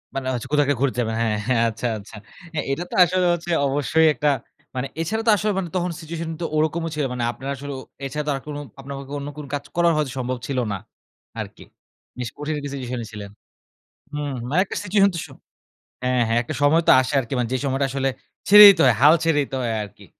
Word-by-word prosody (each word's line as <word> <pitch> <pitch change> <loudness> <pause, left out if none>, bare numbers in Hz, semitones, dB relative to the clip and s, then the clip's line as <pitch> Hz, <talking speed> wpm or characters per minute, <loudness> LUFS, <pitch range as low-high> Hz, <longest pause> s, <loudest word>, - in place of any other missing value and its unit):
মানে 135 -1 -3
হচ্ছে 125 +1 -4
কোথা 145 0 +5
কে 145 - +4
ঘুরতে 135 -3 +1
যাবেন, 110 -1 -2
হ্যাঁ, 110 -2 +1
হ্যাঁ, 120 -2 +3
আচ্ছা, 115 +2 -3
আচ্ছা। 105 +1 -12 0.4
হ্যাঁ, 150 - -1
এটা 165 +5 -1
তো - - -4
আসলে 180 +1 +1
হচ্ছে 175 0 -5 0.2
অবশ্যই 145 +3 +2
একটা 150 0 +1 0.5
মানে 130 +1 -2
এছাড়াও 220 +7 -2
তো - - +7
আসলে 210 +1 0
মানে 175 - -4
তখন 180 -1 0
situation 165 +1 -5
তো - - -1
ওরকমও 160 +2 0
ছিলো, 150 - 0
মানে 120 -1 -3
আপনারা 135 +3 -6
আসলে 140 +1 -7
ও - - -8 0.2
এছাড়া 150 +2 -3
তো - - +1
আর - - -4
কোন 145 -1 -5 0.2
আপনাদের 135 0 -7 0.2
অন্য 140 +1 -6
কোন 150 - -7
কাজ 145 - -4
করা 170 0 +4
হয়তো 150 -4 -1
সম্ভব 125 0 -2
ছিল 135 -2 -3 0.2
না - - -2 0.6
আরকি। - - -7 0.6
বেশ 125 -2 -3
কঠিন 150 +1 -3
কিছু 140 - -5
সিচুয়েশনে 125 -3 -4
এ - - -14
ছিলেন। 100 -2 -8 0.8
হু, - - -3
হু, - - -4
মানে 165 +6 +2
একটা - - -5
সিচুয়েশন 200 0 +4
তো - - -2
সো - - -16 0.7
হ্যাঁ, 125 -1 +2
হ্যাঁ, 115 +1 +2
একটা 120 - -6
সময় 160 +4 +4
তো - - +9
আসে 130 +2 -2
আরকি 120 +1 -9
মানে 120 -2 0
যে, - - +2
সময়টা 135 +1 +1
আসলে 135 0 0 0.4
ছেড়ে 210 +1 +11
দিতে 190 -4 +6
হয় 125 - +5
হাল 150 +4 +8
ছেড়ে 165 -3 +2
দিতে 135 -1 -5
হয় 115 - -1
আরকি। 105 0 -11
140 Hz, 230 wpm, -22 LUFS, 125-160 Hz, 0.8 s, ছেড়ে